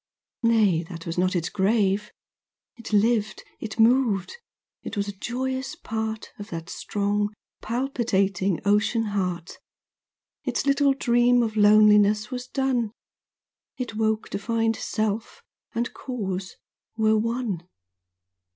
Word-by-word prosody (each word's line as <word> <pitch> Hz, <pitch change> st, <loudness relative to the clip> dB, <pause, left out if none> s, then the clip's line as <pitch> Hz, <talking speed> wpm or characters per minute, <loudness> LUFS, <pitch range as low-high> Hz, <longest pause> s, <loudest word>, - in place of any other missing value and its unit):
Nay, 220 Hz, -8 st, +3 dB
that 165 Hz, -2 st, -8 dB
was 165 Hz, -, -3 dB
not 185 Hz, +1 st, +1 dB
its 170 Hz, -1 st, 0 dB
grave! 205 Hz, 0 st, +1 dB, 0.6 s
It 235 Hz, -1 st, -10 dB
lived, 215 Hz, 0 st, +2 dB, 0.2 s
it 220 Hz, 0 st, -6 dB
moved, 225 Hz, -, +3 dB, 0.5 s
it 225 Hz, -, -6 dB
was 200 Hz, 0 st, 0 dB
a -, -, -2 dB
joyous 260 Hz, +6 st, -3 dB
part 220 Hz, -1 st, -4 dB
Of 205 Hz, +1 st, -8 dB
that 165 Hz, -1 st, -6 dB
strong 205 Hz, 0 st, -1 dB, 0.3 s
palpitating 200 Hz, -, 0 dB
ocean 210 Hz, +3 st, +2 dB
heart; 180 Hz, -3 st, -3 dB, 0.8 s
Its -, -, -1 dB
little 280 Hz, 0 st, +3 dB
dream 240 Hz, -1 st, +3 dB
of 220 Hz, -1 st, -2 dB
loneliness 210 Hz, +1 st, +5 dB
was 250 Hz, 0 st, -5 dB
done; 255 Hz, -5 st, 0 dB, 0.9 s
It 245 Hz, -4 st, -4 dB
woke 220 Hz, 0 st, 0 dB
to -, -, -3 dB
find, 225 Hz, +1 st, 0 dB
Self, 220 Hz, -, -3 dB, 0.3 s
and 235 Hz, +2 st, -1 dB
Cause, 195 Hz, -7 st, -4 dB, 0.4 s
were 220 Hz, 0 st, +3 dB
one. 225 Hz, -6 st, -2 dB
215 Hz, 120 wpm, -25 LUFS, 200-240 Hz, 0.9 s, loneliness